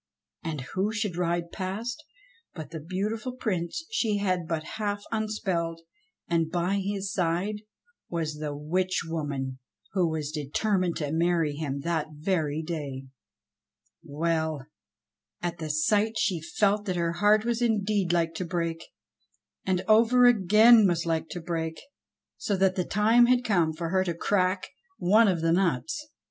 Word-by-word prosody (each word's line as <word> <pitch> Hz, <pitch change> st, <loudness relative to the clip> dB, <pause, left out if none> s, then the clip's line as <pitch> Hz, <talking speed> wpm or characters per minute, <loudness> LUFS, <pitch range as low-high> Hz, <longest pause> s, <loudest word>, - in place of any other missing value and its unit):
And 160 Hz, -5 st, -3 dB
who 195 Hz, +3 st, 0 dB
should 220 Hz, -5 st, -2 dB
ride 170 Hz, -1 st, -1 dB
past 220 Hz, +10 st, -4 dB, 0.5 s
but 160 Hz, -2 st, -8 dB
the 160 Hz, -, -5 dB
beautiful 210 Hz, -, -3 dB
Prince 210 Hz, -, -3 dB
she 220 Hz, -, +1 dB
had 185 Hz, -4 st, -1 dB
but 160 Hz, -2 st, -2 dB, 0.2 s
half 205 Hz, -1 st, -2 dB
unspelled, 190 Hz, -7 st, -2 dB, 0.5 s
and 165 Hz, -2 st, +1 dB
by 180 Hz, +3 st, 0 dB
his 200 Hz, 0 st, -3 dB
side 180 Hz, +4 st, 0 dB, 0.5 s
was 155 Hz, -3 st, -3 dB
the 150 Hz, -1 st, -3 dB
witch 180 Hz, +5 st, 0 dB
woman 140 Hz, -5 st, -3 dB, 0.3 s
who 180 Hz, -4 st, +2 dB
was 155 Hz, -2 st, -3 dB
determined 175 Hz, +5 st, 0 dB
to 145 Hz, -2 st, -3 dB
marry 165 Hz, -2 st, +1 dB
him 140 Hz, -2 st, -3 dB
that 160 Hz, 0 st, -1 dB
very 155 Hz, -1 st, -1 dB
day. 140 Hz, -5 st, -5 dB, 0.9 s
Well! 160 Hz, -1 st, -1 dB, 0.7 s
at 175 Hz, -1 st, -4 dB
the 155 Hz, -1 st, -4 dB
sight 205 Hz, +9 st, +2 dB
she 180 Hz, -5 st, 0 dB
felt 205 Hz, +6 st, +1 dB
that 185 Hz, -3 st, -1 dB
her 170 Hz, -1 st, 0 dB
heart 210 Hz, +4 st, +3 dB
was 235 Hz, 0 st, 0 dB
indeed 210 Hz, -5 st, +1 dB
like 165 Hz, -1 st, +1 dB
to -, -, -2 dB
break, 170 Hz, -2 st, -2 dB, 0.8 s
and 185 Hz, -1 st, 0 dB
over 235 Hz, +3 st, +5 dB
again 220 Hz, 0 st, +7 dB
was 170 Hz, -2 st, 0 dB
like 165 Hz, -1 st, -1 dB
to 175 Hz, -, -5 dB
break, 160 Hz, -1 st, -3 dB, 0.6 s
so 200 Hz, -, -1 dB
that 190 Hz, 0 st, +3 dB
the 180 Hz, -2 st, -1 dB
time 225 Hz, +4 st, +4 dB
had 250 Hz, 0 st, +3 dB
come 175 Hz, -7 st, +2 dB
for 165 Hz, +1 st, -4 dB
her 185 Hz, +1 st, +2 dB
to 170 Hz, -2 st, -2 dB
crack 185 Hz, +1 st, +1 dB, 0.3 s
one 215 Hz, +5 st, +5 dB
of 180 Hz, -4 st, +1 dB
the 165 Hz, 0 st, +2 dB
nuts. 170 Hz, -, 0 dB
175 Hz, 150 wpm, -27 LUFS, 160-205 Hz, 0.9 s, again